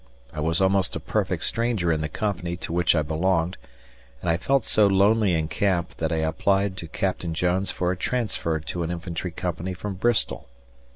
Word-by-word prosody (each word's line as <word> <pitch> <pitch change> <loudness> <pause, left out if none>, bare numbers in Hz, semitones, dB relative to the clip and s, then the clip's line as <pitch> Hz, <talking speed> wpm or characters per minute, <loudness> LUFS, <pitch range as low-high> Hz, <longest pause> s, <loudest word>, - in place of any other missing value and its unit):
I 75 - -5
was 80 +3 +1
almost 95 -2 +2
a - - -2
perfect - - -1
stranger 115 -7 +1
in 80 -1 0
the 80 - -2
company 90 -4 -2
to 85 - -5
which 85 -1 +3
I 75 - +2
belonged, 85 +3 0 0.6
and 85 - 0
I 80 - +2
felt 135 +4 +1
so 105 -2 +4
lonely 100 0 +4
in 80 -1 0
camp 90 0 0
that 80 0 -1
I - - +1
applied 95 +4 +1
to 85 - -6
Captain 85 0 -2
Jones 90 +3 +1
for 90 0 0
a - - -1
transfer 95 -7 -1
to 85 +3 -4
an 85 - -2
infantry 85 0 -4
company 90 +1 -4
from 100 +3 -5
Bristol. 110 - 0
90 Hz, 190 wpm, -25 LUFS, 80-100 Hz, 0.6 s, so